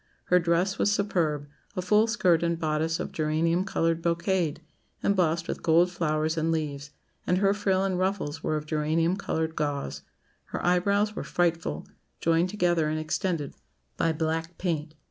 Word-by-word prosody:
Her 180 - +8
dress 175 +3 +1
was 205 - +3
superb 165 -8 0 0.3
a 185 - -1
full 210 +4 +4
skirt 180 -7 +3
and 170 0 0
bodice 160 0 0
of - - -4
geranium 165 +3 +1
coloured 165 -3 0
brocade, 170 -1 0 0.4
embossed 170 -4 +1
with - - -4
gold 170 +2 +4
flowers 155 -2 0
and 160 +1 +1
leaves; 150 -3 -3 0.4
and 180 - +3
her 195 +1 +3
frill 195 -2 +1
and 190 -2 0
ruffles 185 -6 -1
were 155 - 0
of 150 - -5
geranium 160 +3 +1
coloured 160 -5 -2
gauze. 145 -2 -2 0.4
Her - - -5
eyebrows 200 +4 +2
were - - -4
frightful 165 - -1 0.3
joined 165 +2 +2
together 175 -5 +1
and 155 0 -1
extended 155 -1 -2 0.4
by 165 - +1
black 160 +1 -2
paint. 160 -3 -2
165 Hz, 160 wpm, -27 LUFS, 155-185 Hz, 0.4 s, Her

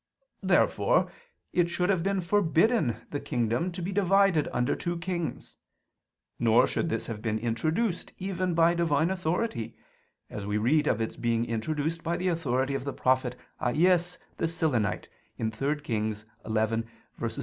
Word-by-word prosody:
Therefore - - +3 0.4
it 175 -1 +2
should 180 +2 0
have 190 0 0
forbidden 170 - +2
the 145 - -2
kingdom 120 +9 -1
to 175 0 -6
be 185 - -2
divided 195 -4 +3
under 125 0 +1
two 175 -1 -3
kings: 175 -1 -4 0.8
nor - - +5
should - - -1
this - - -2
have 110 -2 -6
been 110 -1 -1
introduced 155 - -1
even 185 -2 -2
by 165 +1 +5
Divine 165 -1 +2
authority; 180 - -2 0.5
as 105 - -6
we 105 0 0
read 150 +8 +2
of 115 - +1
its 110 - -2
being 115 0 0
introduced 150 +8 -2
by 170 +1 -1
the 185 +1 0
authority 135 -5 0
of 135 -1 -2
the 140 -1 -4
prophet 130 -1 +1 0.3
Ahias 175 +7 +2 0.2
the 165 - 0
Silonite 145 -11 0 0.3
(3 135 +7 -1
Kings 110 -5 -2 0.2
11:29, 110 +1 +1 0.4
seqq.). - - -3
155 Hz, 150 wpm, -28 LUFS, 120-175 Hz, 0.8 s, nor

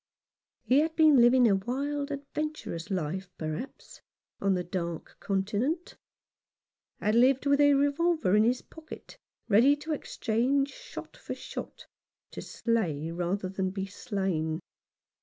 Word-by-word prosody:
He 260 +3 +4
had 320 +1 0
been 310 -5 +6
living 245 +1 +6
a 200 - +4
wild, 280 +7 -2
adventurous 285 - -5
life, 185 0 -3
perhaps, 155 - -6 0.4
on 195 -1 +2
the 180 - -1
Dark 170 -2 -5
Continent; 215 - -1 1.0
had 210 - +1
lived 255 +4 +4
with 280 0 +4
a 285 -1 +6
revolver 285 - +2
in 210 - +5
his 245 +2 +1
pocket, 320 +9 -12 0.3
ready 240 +7 +5
to 305 +2 -4
exchange 275 +1 0
shot - - -10
for - - -7
shot, - - -8 0.5
to - - -7
slay 165 -10 -1
rather 180 +3 -2
than 190 0 -2
be 195 0 -4
slain. 190 -6 -2
235 Hz, 130 wpm, -29 LUFS, 190-285 Hz, 1.0 s, been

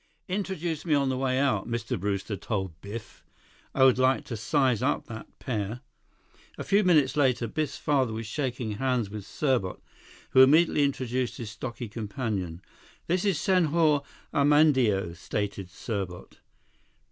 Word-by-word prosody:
"Introduce 180 -5 -3
me 160 -4 +2
on 140 -2 +2
the 130 - 0
way 130 -1 0
out," 130 -8 +1
Mr. 115 -3 -2
Brewster 100 +2 -2
told 95 -6 -4
Biff. 105 0 -9 0.5
"I 135 - +4
would 130 -1 +5
like 130 +1 +3
to 120 - -5
size 125 +1 +1
up - - 0
that 110 -1 -8
pair." 110 -1 -3 0.8
A - - -4
few 200 +2 +3
minutes 155 -8 +4
later, 130 -5 +2
Biff's 150 +7 -3
father 135 -6 +1
was 110 +1 -4
shaking 125 -1 -3
hands 125 -5 0
with 105 -2 -7
Serbot, 130 -11 0 0.5
who 130 - +7
immediately 150 +2 +5
introduced 130 -2 -2
his 115 -3 -6
stocky 120 +2 -6
companion. 105 - -4 0.4
"This 180 +1 0
is 195 -7 +1
Senhor 160 -4 +3 0.3
Armandeo," 130 - +3
stated 100 0 -4
Serbot. 95 -2 -5
125 Hz, 145 wpm, -27 LUFS, 105-145 Hz, 0.8 s, who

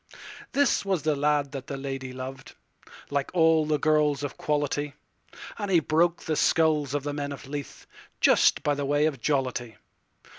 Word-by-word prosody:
This 285 0 +2
was 190 -6 -1
the 155 -1 +1
lad 145 0 +1
the 140 0 -6
lady 135 -1 -5
lov'd, 130 +1 -8 0.6
Like 140 -1 -1
all 160 -2 +4
the 155 -1 +2
girls 150 -2 +2
of 145 - -4
quality; 145 -1 -1 0.6
And 205 -2 -3
he 180 -3 +5
broke 165 +3 +1
the 155 - -1
skulls 150 -4 +2
of 145 - -1
the 145 0 -3
men 145 -1 -4
of 140 - -8
Leith, 145 0 -7 0.3
Just - - +4
by 145 - +2
the 145 0 -3
way 145 +2 +2
of 140 -6 -2
jollity. 130 -5 -1
145 Hz, 165 wpm, -26 LUFS, 140-155 Hz, 0.6 s, he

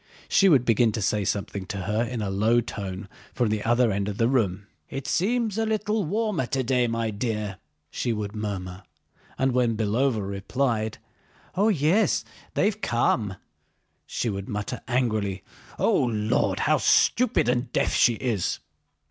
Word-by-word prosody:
She 195 +1 +5
would 135 -7 +4
begin 115 0 +3
to - - -2
say 105 0 +1
something 100 -1 -3
to 100 -3 -4
her 105 +5 0
in 120 -2 -3
a 100 - -2
low 110 +5 +3
tone 100 -3 -5 0.3
from 120 -4 +1
the 105 0 -1
other 120 0 +3
end 100 +1 -1
of 100 - -5
the 115 - +3
room. 100 -7 0 0.2
"It 135 - -5
seems 225 +2 0
a 225 - +1
little 215 -1 0
warmer 205 - -1
today, 130 -2 +1
my 115 -1 -1
dear," 105 -3 -3 0.3
she 120 - -1
would 105 -1 -3
murmur. 95 -3 -4 0.6
And 130 0 +2
when 120 -3 +1
Belóva 110 0 +1
replied: 110 +2 -1 0.6
"Oh 205 +4 +3
yes, 190 +4 +2 0.3
they've 210 +2 +1
come," 115 - +1 0.7
she - - -2
would 100 -2 -4
mutter 105 -1 -4
angrily: 110 -6 0 0.3
"O - - +3
Lord! 110 -3 0
How - - +3
stupid 250 - +3
and 125 +1 0
deaf - - +1
she 120 - +4
is!" 110 -7 -1
115 Hz, 155 wpm, -25 LUFS, 105-135 Hz, 0.7 s, She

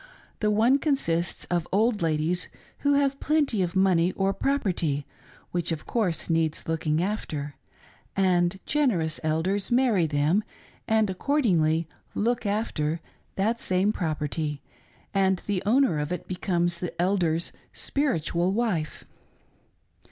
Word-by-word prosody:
The: 210 - +1
one 230 +6 +4
con., 290 -1 +2
sists 170 -8 -1
of 175 -1 0
old 215 +2 +2
ladies 165 +2 0 0.3
who 285 0 +2
have 275 -1 +1
plenty 290 -9 +1
of 180 0 -1
money 185 -2 +3
or 195 0 +1
propertyi 180 - 0 0.5
which 175 -1 -1
of 160 -2 -4
course 185 -10 -1
needs 165 -2 0
looking 160 0 0
after; 155 -8 -3 0.6
and 185 -1 +2
generous 195 - +1
Eldersi 170 +7 0
marry 240 -9 +3
them, 150 +7 +2 0.4
and 220 -1 +3
accordingly 175 - +1 0.2
" - - -36
look 235 -2 0
after 170 -7 -1 0.2
" - - -39
that 220 +4 0
same 190 +3 +1
property, 150 -3 -2 0.5
and 190 -2 +2
the 200 -3 -1
owner 245 - +3
of 150 +2 -3
it 180 - -4
becomes 175 -2 0
the 175 -1 -5
Elder's 175 -3 +1 0.2
spirihial 180 - 0
wife. 195 -8 -1
180 Hz, 130 wpm, -26 LUFS, 160-220 Hz, 0.6 s, one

